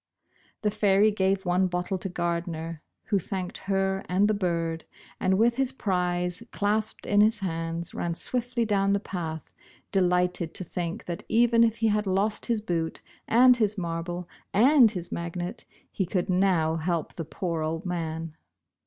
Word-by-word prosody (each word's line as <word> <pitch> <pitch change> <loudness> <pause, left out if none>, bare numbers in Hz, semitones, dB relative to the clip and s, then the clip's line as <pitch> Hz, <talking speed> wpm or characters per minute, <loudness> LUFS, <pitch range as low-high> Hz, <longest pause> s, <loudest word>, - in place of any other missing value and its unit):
The 210 - +2
fairy 205 +1 +4
gave 190 -1 0
one 180 +1 +2
bottle 180 +1 -2
to 195 - -4
Gardner, 170 -2 -3 0.3
who 200 - +3
thanked 185 0 -5
her 195 0 +1
and 190 +3 +3
the 215 - +2
bird, 170 -4 -1 0.3
and 190 0 +2
with 235 +3 +3
his 270 -1 +1
prize 180 -4 -1
clasped 215 +1 -1
in 205 0 +4
his 215 0 +3
hands, 165 -1 -3
ran 170 -1 -2
swiftly 245 +3 -1
down 200 -2 +2
the 200 - +2
path, 165 -6 -5 0.4
delighted 180 -3 +1
to - - -1
think 170 0 -4
that 170 -1 -4
even 235 0 +5
if 225 -1 +2
he 225 -1 +2
had 210 -1 0
lost 200 +3 +1
his 230 -3 +1
boot 165 -5 -2 0.3
and 250 +2 +6
his 215 -2 +1
marble 170 0 -4 0.3
and 240 -2 +6
magnet, 175 +1 -4 0.3
he 190 - -1
could 185 +1 -1
now 180 -4 +2
help 165 0 -2
the 165 - -5
poor 165 +1 -3
old 160 +2 -3
man. 165 -2 -3
185 Hz, 160 wpm, -27 LUFS, 170-210 Hz, 0.4 s, and